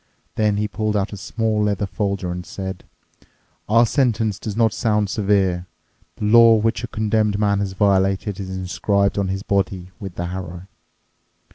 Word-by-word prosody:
Then 105 -2 +1
he 105 0 0
pulled 105 0 -1
out 100 +1 -2
a - - -4
small 110 +2 -1
leather 105 -1 0
folder 100 -2 -2
and 90 0 -5
said, 95 +1 -7 0.8
"Our 115 +2 +5
sentence 110 -6 +1
does 110 -2 -5
not 115 -3 +3
sound 105 -3 0
severe. 95 -4 +1 0.5
The 105 - -4
law 115 +1 +7
which 115 +3 0
a - - -3
condemned 110 -2 0
man 100 -1 +1
has 100 -1 -2
violated 95 0 +1
is 95 -1 -5
inscribed 100 +2 0
on 100 - 0
his 95 +1 -3
body 95 -2 -1
with 95 -3 -7
the 85 - -3
harrow. 90 -1 -6
100 Hz, 165 wpm, -21 LUFS, 95-110 Hz, 0.8 s, law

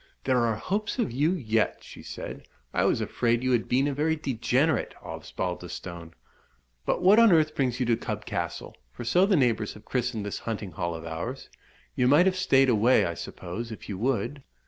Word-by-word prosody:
"There 130 -2 +2
are 115 -2 +1
hopes 200 - -2
of 240 - 0
you 145 +8 +2
yet," 115 - 0
she - - -11
said. - - -8 0.3
"I - - +2
was - - +2
afraid 120 0 0
you 130 - +1
had 120 -2 +1
been 135 +3 +3
a 145 - -1
very 155 +3 +1
degenerate 135 +1 0
Osbaldistone. 85 -2 -6 0.7
But - - 0
what 200 +5 +7
on 230 -3 +7
earth 155 -2 +4
brings 125 -2 0
you 125 - +1
to 120 -1 +3
Cub 115 - -5
Castle? - - -4 0.2
for 60 - -8
so 180 +11 +3
the 200 - +4
neighbours 115 -7 +1
have 105 0 -14
christened 120 -4 -2
this 105 - -4
hunting 105 -4 -4
hall 85 +1 -3
of 80 0 -8
ours. 85 +12 -5 0.5
You 125 - +2
might 145 +7 +6
have 190 -1 +2
stayed 135 -8 +4
away, 120 +1 +4
I 85 - -2
suppose, 95 +7 -6
if 110 - -9
you 95 -2 -5
would?" 125 +3 -1
125 Hz, 195 wpm, -27 LUFS, 110-145 Hz, 0.7 s, what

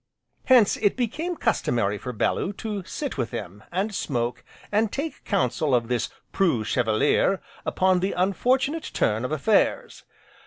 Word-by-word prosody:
Hence, 245 -6 +5
it 205 - +1
became 305 +9 -2
customary 115 - 0
for 125 - -5
Bellew 125 - 0
to 205 -1 -4
sit 280 - -4
with 120 -2 -1
him, 100 +2 -7
and 195 +4 -1
smoke, 120 -9 -2 0.3
and 210 0 +2
take 300 +3 -4
counsel 150 - +1
of 120 -1 0
this 125 -1 0 0.2
"preux 165 - +2
chevalier" 120 - +2 0.3
upon 185 -1 +3
the 190 +2 -1
unfortunate 255 - +1
turn 110 +2 +1
of 125 - -3
affairs. 155 +8 +1
185 Hz, 145 wpm, -25 LUFS, -, 0.3 s, Hence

